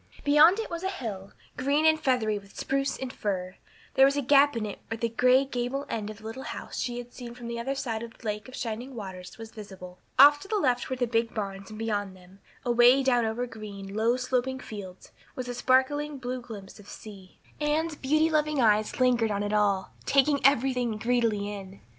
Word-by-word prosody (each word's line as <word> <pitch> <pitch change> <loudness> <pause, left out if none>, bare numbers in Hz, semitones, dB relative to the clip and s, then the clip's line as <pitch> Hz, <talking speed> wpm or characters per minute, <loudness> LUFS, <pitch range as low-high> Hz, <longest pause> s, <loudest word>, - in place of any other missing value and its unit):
Beyond 300 +6 +6
it 450 - -4
was 335 0 -4
a 380 - -1
hill, 210 - -6 0.3
green 280 +4 +1
and 315 0 +5
feathery 240 -7 +1
with 200 0 -18
spruce 275 0 -1
and 260 -1 -5
fir; 185 -3 -3 0.4
there 265 - +6
was 280 +1 0
a 285 - 0
gap 285 0 +5
in 220 - -2
it 205 - -6
where 225 - -4
the 230 +1 -1
gray 255 +4 +4
gable 265 +2 -3
end 215 -2 -3
of 215 - -8
the 220 - -17
little 225 +4 -6
house - - -6
she 245 -1 -2
had 245 0 -8
seen 240 -2 -9
from 245 -1 -10
the 235 0 -4
other 270 +4 -2
side 230 -5 -3
of 230 -1 -9
the - - -17
Lake 210 +1 -3
of 255 - -10
Shining 240 +3 -5
Waters 190 -4 -8
was 225 -1 -9
visible. 190 -4 -10 0.2
Off 290 +2 +8
to 390 - -11
the 430 - -1
left 250 -9 +1
were 260 - -1
the 250 -1 0
big 230 -1 -1
barns 195 -2 -5
and 215 - -9
beyond 205 -3 -2
them, 185 +2 -18 0.3
away 245 +2 +5
down 245 -3 +3
over 225 +3 -2
green, 205 -4 -9
low 225 +3 +2
sloping 255 +1 -1
fields, 200 -7 -9 0.2
was 255 -1 -5
a 245 - -3
sparkling 275 +4 +1
blue 255 0 -4
glimpse 210 -4 -10
of 205 - -14
sea. 195 -4 -12 0.2
Anne's 310 +2 0
beauty 310 +3 +2
loving 305 -1 +1
eyes 215 -1 +2
lingered 245 -3 +3
on 205 0 -1
it 205 +1 -2
all, 200 -3 +1
taking 280 +1 +3
everything 250 -4 +2
greedily 220 -3 0
in. 195 -1 -9
240 Hz, 215 wpm, -27 LUFS, 210-270 Hz, 0.4 s, Off